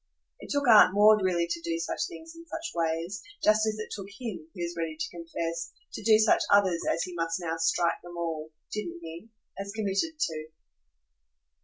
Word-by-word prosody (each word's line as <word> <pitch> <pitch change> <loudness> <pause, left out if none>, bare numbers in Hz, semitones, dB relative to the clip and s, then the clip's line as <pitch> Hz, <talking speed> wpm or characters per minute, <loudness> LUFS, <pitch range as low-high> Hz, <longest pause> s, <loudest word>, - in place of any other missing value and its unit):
It - - -11
took 285 -1 0
Aunt 210 -4 +8
Maud 210 +1 +7
really 175 -2 +2
to 170 0 -3
do 165 0 -2
such 165 - -2
things 330 -3 -10
in 335 - -11
such 325 +1 -5
ways; 165 +3 -1 0.2
just 215 +1 +4
as 215 0 -1
it 215 - -6
took 195 -2 -7
him, 205 -7 -7
he 175 - -4
was 170 0 -4
ready 165 -2 -3
to - - -2
confess, 170 0 -4 0.2
to - - -5
do 220 -1 +6
such 215 0 +4
others 190 -4 +4
as 165 - 0
he 180 - -6
must 165 0 -1
now 165 -2 -2
strike 165 +1 +1
them 175 0 -10
all 160 -2 -3 0.2
didn't 205 -6 -4
he? 165 +7 -9 0.3
as 200 0 -4
committed 215 +9 -1
to. 155 - -2
175 Hz, 195 wpm, -28 LUFS, 165-215 Hz, 0.3 s, Aunt